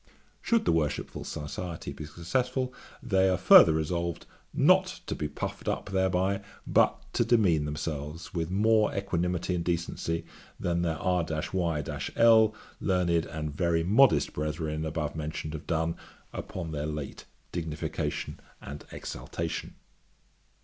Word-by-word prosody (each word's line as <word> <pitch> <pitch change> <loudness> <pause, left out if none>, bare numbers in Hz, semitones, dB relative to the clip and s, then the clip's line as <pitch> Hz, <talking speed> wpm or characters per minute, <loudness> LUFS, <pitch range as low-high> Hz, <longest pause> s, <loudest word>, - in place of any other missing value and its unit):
'Should 230 -1 +2
the - - +4
Worshipful 80 -3 -1
Society 80 +3 -5
be 75 - -7
successful, 125 - -1 0.3
they 95 -5 +3
are 95 - +2
farther 90 -2 +9
resolved 85 +2 -2 0.3
not - - +4
to - - -3
be 75 - -2
puffed 75 - -5
up - - -2
thereby, 95 +1 +1 0.2
but - - +3
to - - +3
demean 100 -11 +3
themselves 75 +5 -5
with 85 -2 -2
more 105 +3 +3
equanimity 90 -2 -1
and 85 -1 -1
decency 85 -1 -2 0.3
than 85 -1 0
their 80 -2 0
R 90 +1 +1 0.3
y 85 -5 0 0.3
l, 110 -2 +6 0.2
learned, 85 -3 +1
and 75 -2 -5
very 85 -1 +1
modest 115 +10 +4
brethren 75 +1 -2
above 75 -1 -3
mentioned 75 0 -4
have 80 -1 -7
done, 80 0 0 0.4
upon 85 -3 -5
their 75 -1 -2
late 75 -3 -5 0.3
dignification 80 -3 -3 0.2
and 75 +1 -8
exaltation.' 85 -1 -5
85 Hz, 130 wpm, -29 LUFS, 80-95 Hz, 0.4 s, farther